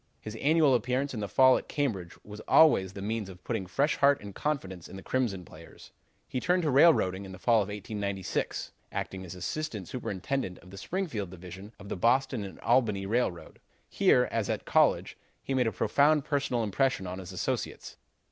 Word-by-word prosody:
His 110 Hz, +1 st, -8 dB
annual 150 Hz, +1 st, +4 dB
appearance 125 Hz, +4 st, 0 dB
in 115 Hz, -, -4 dB
the 105 Hz, -, -3 dB
fall 130 Hz, +5 st, +5 dB
at -, -, -13 dB
Cambridge 105 Hz, -, -2 dB
was 105 Hz, 0 st, -9 dB
always 95 Hz, -, +5 dB
the 100 Hz, -, -7 dB
means 110 Hz, -1 st, -3 dB
of 90 Hz, -1 st, -13 dB
putting 110 Hz, -6 st, -3 dB
fresh 140 Hz, -, +1 dB
heart 140 Hz, 0 st, +4 dB
and 100 Hz, -1 st, -9 dB
confidence 95 Hz, -, -3 dB
in -, -, -10 dB
the 95 Hz, -, -9 dB
Crimson 110 Hz, -9 st, -1 dB
players. 80 Hz, +2 st, -14 dB, 0.4 s
"He 130 Hz, -, -3 dB
turned 180 Hz, +5 st, +1 dB
to 150 Hz, -, +1 dB
railroading 125 Hz, -, +4 dB
in 95 Hz, -1 st, -9 dB
the -, -, -9 dB
fall 115 Hz, +3 st, +3 dB
of 100 Hz, -, -3 dB
1896, 100 Hz, -2 st, -3 dB, 0.2 s
acting 95 Hz, -1 st, -4 dB
as 90 Hz, 0 st, -8 dB
Assistant 105 Hz, -, -4 dB
Superintendent 120 Hz, -3 st, -3 dB
of 90 Hz, -, -16 dB
the 100 Hz, -, -10 dB
Springfield 160 Hz, -, -3 dB
Division 95 Hz, +3 st, -10 dB
of 100 Hz, -, -12 dB
the -, -, -4 dB
Boston 120 Hz, +2 st, +2 dB
and 95 Hz, -, -9 dB
Albany 115 Hz, -5 st, +2 dB
Railroad. 105 Hz, -5 st, -2 dB, 0.3 s
Here, -, -, +3 dB
as -, -, -1 dB
at -, -, -2 dB
college, -, -, +2 dB, 0.2 s
he 135 Hz, -, -3 dB
made 125 Hz, -3 st, +2 dB
a -, -, +1 dB
profound 145 Hz, +3 st, +2 dB
personal 140 Hz, -5 st, 0 dB
impression 110 Hz, +1 st, 0 dB
on 90 Hz, +1 st, -5 dB
his 95 Hz, 0 st, -8 dB
associates. 90 Hz, -, -4 dB
110 Hz, 190 wpm, -29 LUFS, 95-135 Hz, 0.4 s, fall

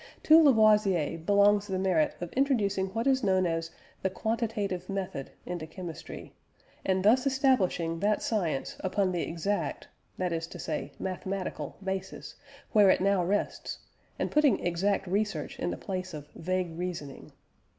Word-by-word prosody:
To 315 Hz, +1 st, +8 dB
Lavoisier 210 Hz, -, +4 dB
belongs 205 Hz, +3 st, +4 dB
the 190 Hz, -2 st, -2 dB
merit 185 Hz, -5 st, +2 dB
of 175 Hz, -, -5 dB
introducing 210 Hz, -8 st, +1 dB
what 225 Hz, +5 st, -3 dB
is 265 Hz, -1 st, +2 dB
known 185 Hz, -2 st, +3 dB
as 165 Hz, -1 st, -1 dB, 0.3 s
the 190 Hz, -, +1 dB
"quantitative 210 Hz, -3 st, -2 dB
method" 190 Hz, -8 st, -4 dB, 0.2 s
into 175 Hz, -3 st, -5 dB
chemistry, 170 Hz, 0 st, -8 dB, 0.5 s
and 190 Hz, 0 st, 0 dB
thus 250 Hz, +5 st, +5 dB
establishing 205 Hz, -12 st, +1 dB
that 205 Hz, +3 st, +1 dB
science 175 Hz, -11 st, -1 dB
upon 190 Hz, 0 st, 0 dB
the 175 Hz, -2 st, -1 dB
exact 195 Hz, +5 st, -2 dB, 0.3 s
that 180 Hz, -2 st, -1 dB
is 165 Hz, 0 st, -3 dB
to -, -, -9 dB
say 155 Hz, -, -4 dB
mathematical 190 Hz, 0 st, -4 dB
basis, 190 Hz, 0 st, -4 dB, 0.4 s
where 205 Hz, -3 st, +6 dB
it -, -, +4 dB
now 195 Hz, -1 st, +2 dB
rests 200 Hz, +4 st, -2 dB, 0.4 s
and -, -, -2 dB
putting 295 Hz, -, +3 dB
exact 190 Hz, +3 st, +1 dB
research 195 Hz, -4 st, -2 dB
in -, -, -1 dB
the -, -, -3 dB
place 185 Hz, -3 st, -5 dB
of 150 Hz, -1 st, -8 dB
vague 180 Hz, -1 st, -2 dB
reasoning. 170 Hz, -6 st, -5 dB
190 Hz, 150 wpm, -29 LUFS, 175-210 Hz, 0.5 s, To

